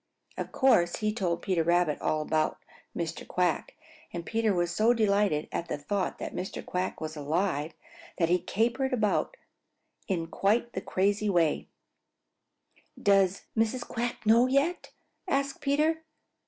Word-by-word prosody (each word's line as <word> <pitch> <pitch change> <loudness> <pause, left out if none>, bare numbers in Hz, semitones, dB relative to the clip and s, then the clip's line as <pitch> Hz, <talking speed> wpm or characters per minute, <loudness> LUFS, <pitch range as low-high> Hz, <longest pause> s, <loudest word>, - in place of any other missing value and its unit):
Of - - -5
course 175 -11 +3
he 215 0 -1
told 175 -6 -1
Peter 185 -4 +1
Rabbit 170 -2 +2
all 155 0 0
about 155 0 0 0.4
Mr. 165 -1 -4
Quack, 180 -3 0 0.4
and 170 -1 -5
Peter 225 -1 +1
was 175 -2 0
so 225 +6 +3
delighted 200 -8 +2
at 170 - -3
the - - -3
thought 185 +7 -2
that - - -6
Mr. 185 - -5
Quack 180 +1 -2
was 155 0 -5
alive 155 +1 -1 0.4
that 165 - +2
he 180 +2 +3
capered 240 +8 0
about 225 - 0 0.7
in 175 -5 -1
quite 215 +8 0
the 190 - -3
craziest 200 +1 0
way. 165 -3 +2 1.3
"Does 195 -2 +3
Mrs. 225 +2 0
Quack 240 -1 -3
know 230 +3 +6
yet?" 280 +7 +1 0.4
asked 275 -4 -1
Peter. 305 +3 +1
195 Hz, 140 wpm, -29 LUFS, 170-235 Hz, 1.3 s, know